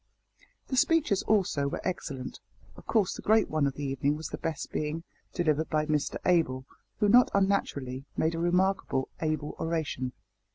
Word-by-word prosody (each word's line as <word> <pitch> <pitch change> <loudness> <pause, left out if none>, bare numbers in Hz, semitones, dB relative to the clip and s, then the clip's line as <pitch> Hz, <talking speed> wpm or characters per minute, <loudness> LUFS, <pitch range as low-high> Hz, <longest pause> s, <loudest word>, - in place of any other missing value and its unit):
The 260 - -1
speeches, 300 - +3
also, 185 -9 +2
were 140 - -3
excellent. 140 -8 -4 0.4
Of - - -15
course 210 -5 +2
the - - -7
great 220 0 +3
one 155 -2 +2
of 135 - -3
the 145 - -5
evening 140 +2 0
was 155 -1 -6
the - - -6
best 165 -1 -4
being, 155 +2 -2 0.3
delivered 160 -3 0
by 155 -1 +1
Mr 150 -1 0
Abel, 145 -8 +2 0.3
who 210 - +2
not 245 +4 +6
unnaturally 140 -10 0
made 160 +1 +2
a 165 - -3
remarkably 175 -5 +1 0.2
able 155 -2 -2
oration. 155 -6 -2
160 Hz, 165 wpm, -29 LUFS, 140-190 Hz, 0.4 s, not